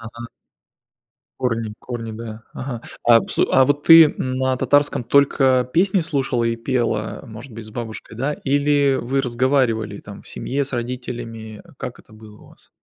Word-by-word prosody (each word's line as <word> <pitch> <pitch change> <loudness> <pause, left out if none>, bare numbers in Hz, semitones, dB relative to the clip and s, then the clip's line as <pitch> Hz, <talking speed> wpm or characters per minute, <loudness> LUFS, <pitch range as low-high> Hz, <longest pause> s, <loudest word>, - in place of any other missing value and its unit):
Ага. 115 +1 -9 1.1
Корни 115 -3 -2
корни, 115 -2 -6
да. 110 0 -8
Ага. 125 -3 -6 0.2
А 115 -1 +7
вс - - -6
а 130 - +6
вот 145 +2 0
ты, 165 -1 +10
м, 130 -3 -3
на 130 0 0
татарском 145 -1 +2
только 130 -2 +3
песни 190 +3 +3
слушала 135 -6 -1
и 115 0 0
пела, 115 -3 -2
может 115 +3 -10
быть 115 0 -9
с - - -12
бабушкой, 110 -1 -7
да? 135 +5 -1
Или 140 0 +2
вы 135 +3 0
разговаривали 120 -4 0
там, 100 -1 -11
в - - -14
семье, 140 +2 -2
с 135 - -7
родителями? 120 -3 -6
Как - - -7
это - - -22
было 110 -1 -15
у - - -17
вас? - - -21
125 Hz, 170 wpm, -21 LUFS, 115-135 Hz, 1.1 s, ты